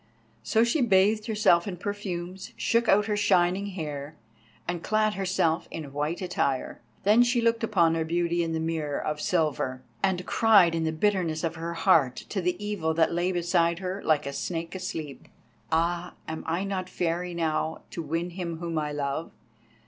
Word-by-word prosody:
So 220 - +2
she 235 +6 +1
bathed 210 0 +3
herself 210 -6 +3
in 185 -3 -4
perfumes, 190 -2 -5
shook 235 0 +1
out 210 +1 +5
her 210 -1 0
shining 195 -1 +2
hair, 155 -5 -5 0.5
and 175 -1 -2
clad 215 +1 +1
herself 180 -4 0
in 150 -4 -7
white 150 +5 -2
attire. 140 -7 -1 0.2
Then 210 +4 +5
she 245 0 +3
looked 230 0 +1
upon 175 -7 +3
her 165 0 0
beauty 170 +1 0
in 165 -1 -1
the 160 - -1
mirror 160 -3 -2
of 150 0 -3
silver, 145 -6 0 0.2
and 185 -2 0
cried 205 -7 +5
in 165 -1 0
the 160 - +1
bitterness 170 -2 0
of 165 -1 0
her 165 +1 -5
heart 145 -6 +4
to 195 - -2
the 180 0 0
Evil 200 -7 -2
that 165 0 +3
lay 175 +2 +1
beside 170 -1 +1
her 190 +2 -4
like 150 -2 +2
a 140 - -4
snake 165 +4 -4
asleep. 160 -7 -6 0.4
"Ah, 170 +2 0
am 160 0 -5
I 170 +4 0
not 190 -2 -3
fair 175 -1 -1
enow 165 -2 -2
to 170 - -4
win 165 +3 -2
him 170 -2 -4
whom 165 -1 -2
I 150 -1 -2
love? 145 +2 -3
175 Hz, 180 wpm, -27 LUFS, 160-195 Hz, 0.5 s, out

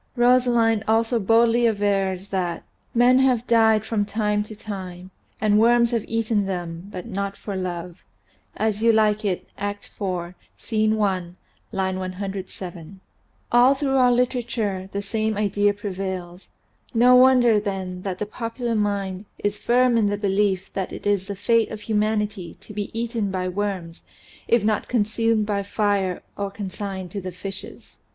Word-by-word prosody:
Rosalind 240 -3 +3
also 225 +2 +2
boldly 230 +3 +4
avers 200 -3 0
that 180 -3 -2 0.3
"men 245 +2 +5
have 255 -3 +2
died 220 -2 +4
from 220 -3 0
time 210 0 0
to 215 - -10
time, 185 -3 -7 0.3
and 210 -1 +3
worms 235 +1 +4
have 230 -3 0
eaten 225 -3 0
them, 175 0 -5
but 180 - -6
not 200 -2 -4
for 200 - -6
love 180 -1 -5 0.3
" - - -37
("As 215 -1 -1
You 230 0 +5
Like 215 -1 +2
It," 190 -4 -2
Act. 205 0 -5
IV, 180 -3 -2 0.2
Scene 215 -1 0
i, 185 -4 0 0.4
line 190 -1 -1
107). 185 -1 -5
And 170 +4 -13 0.5
all 245 +3 +6
through 270 -1 0
our 250 -1 +5
literature 235 -6 -1
the 200 0 -3
same 215 +1 -1
idea 205 0 +2
prevails. 190 -3 -5 0.5
No 245 +2 +6
wonder 250 -3 +6
then 190 -3 -4
that 185 -1 -4
the 210 - -2
popular 230 +2 -4
mind 200 -2 -1
is 205 0 -2
firm 245 0 +3
in 215 -2 +3
the 205 - -1
belief 195 -2 0
that 190 -1 -3
it - - -8
is 200 -2 +1
the 200 - -4
fate 225 +3 +2
of 215 - -7
humanity 210 -4 -1
to 210 - -12
be 205 -1 -3
eaten 230 -3 -1
by 185 -1 -2
worms 185 -3 -3 0.5
if 235 -3 +3
not 215 0 0
consumed 225 -1 +1
by 205 -1 -1
fire 200 -2 0
or 200 -1 -3
consigned 195 -2 -6
to 200 - -4
the 185 0 -5
fishes. 195 +2 -9
205 Hz, 160 wpm, -23 LUFS, 190-225 Hz, 0.5 s, all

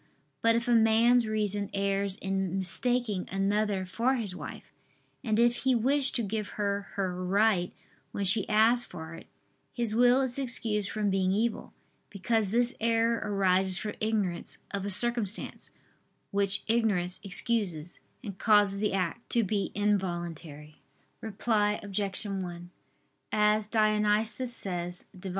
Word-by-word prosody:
But 230 0 +3
if 235 +2 -1
a - - +1
man's 230 +1 +4
reason, 205 -2 -1
errs 200 0 -1
in 195 -2 -2
mistaking 215 +1 +1
another 195 0 0
for 235 +8 0
his 210 -7 -4
wife, - - -9 0.5
and 220 -4 0
if 240 +1 +3
he 260 -1 +1
wish 270 +4 +3
to 235 - -1
give 210 0 -3
her 200 -1 -2
her 185 -2 -3
right 195 -1 +2 0.4
when 200 - -3
she 195 +2 +1
asks 225 +3 +4
for 160 -7 -9
it, - - -12 0.4
his 235 -3 -2
will 245 +3 +4
is 260 0 -2
excused 220 -6 -1
from 210 -2 -1
being 190 -1 +1
evil: 220 +3 -1 0.4
because 210 +1 -1
this 240 +4 +2
error 230 0 +1
arises 190 -2 +2
from 210 0 -4
ignorance 210 -5 -1
of 200 0 -3
a - - -2
circumstance, 225 0 -1 0.6
which 200 -1 +1
ignorance 205 -6 +1
excuses, 185 -5 -1 0.2
and 200 -5 -8
causes 205 -3 +4
the 210 -1 0
act 190 +4 -3
to 235 - +4
be 200 0 -1
involuntary. 175 -7 -3 0.4
Reply 210 -1 0
Obj. 200 -1 -2
1: 180 -3 -6 0.6
As 210 0 +2
Dionysius 215 +2 +2
says 180 -5 0
(Div. 185 +1 -6
210 Hz, 140 wpm, -28 LUFS, 190-225 Hz, 0.6 s, man's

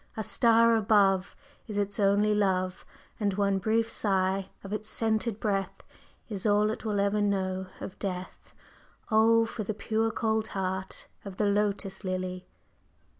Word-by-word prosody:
A 220 - -1
star 230 +2 +4
above 200 -3 +3 0.3
Is 210 -2 -5
its 205 0 -1
only 205 +1 +3
love, 185 -3 0 0.3
And 200 -3 0
one 200 -1 +1
brief 225 +3 +1
sigh 195 -3 0
of 195 +1 -6
its 215 0 -4
scented 220 -1 0
breath 195 -3 -2 0.4
Is 200 -4 -5
all 210 +1 +3
it - - -6
will 210 -2 -1
ever 200 +1 +1
know 190 -2 -1
of 185 - -8
Death; 185 -2 -6 0.6
Oh, 225 +1 +5
for 225 -1 -5
the 210 +1 -4
pure 220 +1 0
cold 220 -1 0
heart 190 0 -3 0.2
of 195 -2 -8
the 210 - +1
Lotus 200 -1 0
Lily! 185 -1 -4
205 Hz, 150 wpm, -28 LUFS, 190-220 Hz, 0.6 s, Oh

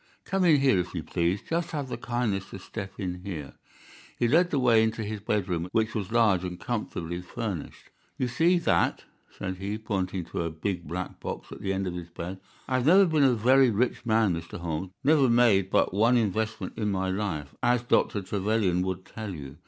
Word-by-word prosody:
"Come 195 -1 +1
in 155 -4 +6
here, 130 -9 +4
if 90 0 -4
you 85 - -3
please. 85 +5 -1
Just 170 +1 -1
have 145 -4 -3
the - - -4
kindness 110 -6 -2
to - - -7
step 95 +1 -7
in 90 -3 -4
here." 80 -8 -6 0.6
He 120 - +2
led 170 +8 +4
the 145 - 0
way 120 -4 +5
into 110 0 -1
his 105 0 -4
bedroom, 90 -5 -1
which 110 -1 +1
was 105 -1 -3
large 110 -6 +3
and 90 -1 -5
comfortably 90 -7 -3
furnished. 90 -2 -6 0.3
"You 130 - 0
see 170 +8 +3
that," 170 - +1 0.3
said 95 0 -5
he, 100 +3 -3
pointing 95 -4 -2
to - - -4
a 85 - -1
big 85 +2 -4
black 90 +2 -5
box - - -6
at - - -9
the 95 - -1
end 95 0 -1
of 90 - -3
his 85 -1 -7
bed. 90 +3 -6 0.3
"I 130 - +1
have 130 +2 0
never 190 +4 +7
been 160 -4 +2
a 130 -3 +5
very 130 +4 +5
rich 120 +4 0
man, 110 -5 +3
Mr. 85 0 -6
Holmes—never 95 - +1
made 115 -6 +4
but - - +2
one 115 +5 +4
investment 110 -2 -2
in 105 -1 0
my 95 -1 0
life, 90 -8 -3
as 120 0 +2
Dr. 105 -4 +1
Trevelyan 100 -2 0
would 95 0 -3
tell 105 -2 -6
you. 70 -3 -9
100 Hz, 205 wpm, -27 LUFS, 90-120 Hz, 0.6 s, never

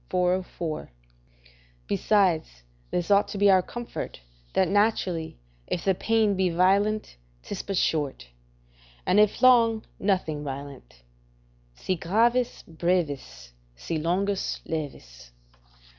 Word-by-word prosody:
404.] 180 -3 -1 1.0
Besides, 160 - +1 0.3
this 175 +2 -2
ought 200 0 +5
to - - -6
be 200 0 +5
our 190 -1 +5
comfort, 240 - -7 0.3
that 190 - +3
naturally, 190 - 0 0.3
if 170 - -3
the 195 - +4
pain 220 +1 +1
be 190 -1 +1
violent, 195 - +1 0.3
'tis 200 - -5
but 195 -2 -3
short; 145 - -1 0.8
and 190 - +4
if 210 +4 +3
long, 230 -3 +5 0.2
nothing 180 -7 0
violent: 135 - -8 0.7
"Si 185 - -2
gravis, 230 +8 +1
brevis; 150 - -2 0.2
Si 155 - -4
longus, 190 +5 -1
levis." 65 - -6
180 Hz, 110 wpm, -26 LUFS, 155-205 Hz, 1.0 s, ought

